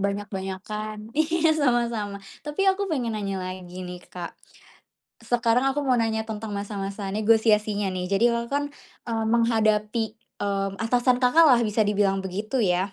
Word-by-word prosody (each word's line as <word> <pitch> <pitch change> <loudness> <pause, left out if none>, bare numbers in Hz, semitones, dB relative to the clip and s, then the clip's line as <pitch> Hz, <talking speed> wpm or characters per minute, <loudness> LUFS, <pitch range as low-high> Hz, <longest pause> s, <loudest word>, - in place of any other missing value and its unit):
banyak-banyakan. 205 +2 -4
Iya, 320 +1 +2
sama-sama. 235 -8 0 0.2
Tapi, 300 +6 -2
aku 390 +1 +2
pengen 250 -8 -1
nanya 195 -3 -3
lagi, 185 0 -7
nih, 180 0 -7
Kak. 175 -2 -7 0.9
Sekarang 240 +1 +2
aku 290 - -1
mau 260 -3 +2
nanya 220 -1 0
tentang 215 -1 -5
masa-masa 200 0 -4
negosiasinya, 210 -1 +2
nih. 185 -1 -3
Jadi, 200 +4 +3
Kakak, 235 0 -1
kan, 285 0 +1 0.4
eee, 225 -1 -1
menghadapi, 220 -1 +1 0.3
mmm, 195 -1 -1
atasan 245 +3 +2
Kakaklah 255 -3 +6
bisa 215 +1 0
dibilang 195 -2 +2
begitu, 210 +7 -2
ya. 185 0 +1
215 Hz, 140 wpm, -25 LUFS, 200-240 Hz, 0.9 s, Kakaklah